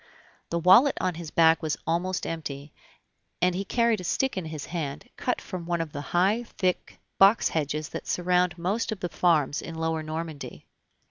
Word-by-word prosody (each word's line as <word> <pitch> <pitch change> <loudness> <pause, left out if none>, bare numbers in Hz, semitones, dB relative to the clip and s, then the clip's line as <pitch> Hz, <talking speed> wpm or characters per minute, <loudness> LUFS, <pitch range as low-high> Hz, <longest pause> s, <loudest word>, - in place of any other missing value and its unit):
The 170 - -1
wallet 190 - +6
on 185 -1 0
his 165 -1 -7
back 165 0 +4
was 155 -2 -1
almost 175 +3 -1
empty, 145 -3 -5 0.7
and 180 0 +3
he 190 +2 -2
carried 230 0 +1
a - - -8
stick 265 +9 0
in 185 -3 -3
his 155 -2 -6
hand, 155 - -5
cut 250 - -1
from 180 -4 -7
one 170 -1 0
of 165 -2 -3
the 145 - -5
high, 190 +9 +1
thick 185 -5 -2 0.2
box 195 +4 +6
hedges 150 -1 -2
that - - -7
surround 180 -1 +1
most 195 +8 -1
of 215 - -4
the 175 - -2
farms 155 -6 +2
in 165 - -7
Lower 160 0 -1
Normandy. 155 -1 -6
170 Hz, 185 wpm, -27 LUFS, 160-185 Hz, 0.7 s, wallet